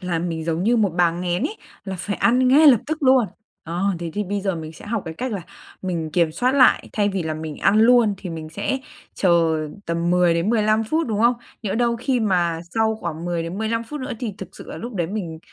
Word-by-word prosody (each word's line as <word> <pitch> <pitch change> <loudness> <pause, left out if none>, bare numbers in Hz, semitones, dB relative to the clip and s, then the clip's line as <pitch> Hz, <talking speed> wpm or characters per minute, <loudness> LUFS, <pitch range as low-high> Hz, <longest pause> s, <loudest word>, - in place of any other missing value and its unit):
là 180 -3 -2
mình 165 -2 -3
giống 165 +1 -1
như 235 +4 +3
một 205 -4 +2
bà 175 -1 +4
nghén 175 +2 -2
ấy, 320 +10 -2 0.3
là 190 -1 -4
phải 205 +2 -3
ăn 250 +2 +3
ngay 300 +4 +6
lập 245 -7 +7
tức 315 0 -3
luôn. 260 -3 +5 0.4
Ờ, 170 +3 -3 0.2
thế 170 -1 -5
thì 210 0 -1
bây 200 +2 -2
giờ 195 -1 -1
mình 160 -1 -7
sẽ 170 - -13
học 215 -1 -2
cái 160 - -6
cách 250 +6 -4
là 195 -4 -4 0.4
mình 170 -4 -3
kiểm 170 -3 +2
soát 250 - +1
lại 260 -3 +4
thay 205 -1 +1
vì 195 -2 -2
là 160 -1 -3
mình 155 -1 -6
ăn 200 +2 +3
luôn 230 -2 +5
thì 185 -1 -7
mình 160 -1 -6
sẽ 200 +11 -2 0.4
chờ 170 -3 +3 0.3
tầm 170 +1 -1
10 180 -1 +4
đến 170 +5 0
15 215 -1 +2
phút, 315 +7 0
đúng 215 -2 -1
không? 240 +1 +4 0.3
Nhỡ 205 -3 -2
đâu 235 0 +1
khi 250 +1 0
mà 175 -5 +1
sau 220 0 +2
khoảng 170 -4 -5
10 170 -1 -1
đến 170 +4 -5
15 230 +1 -1
phút 295 +5 -7
nữa 260 0 -4
thì 230 -4 -3
thực 190 - -7
sự - - -11
là - - -6
lúc 235 -1 -7
đấy 170 -3 -1
mình 175 -5 -5
195 Hz, 250 wpm, -22 LUFS, 170-230 Hz, 0.4 s, lập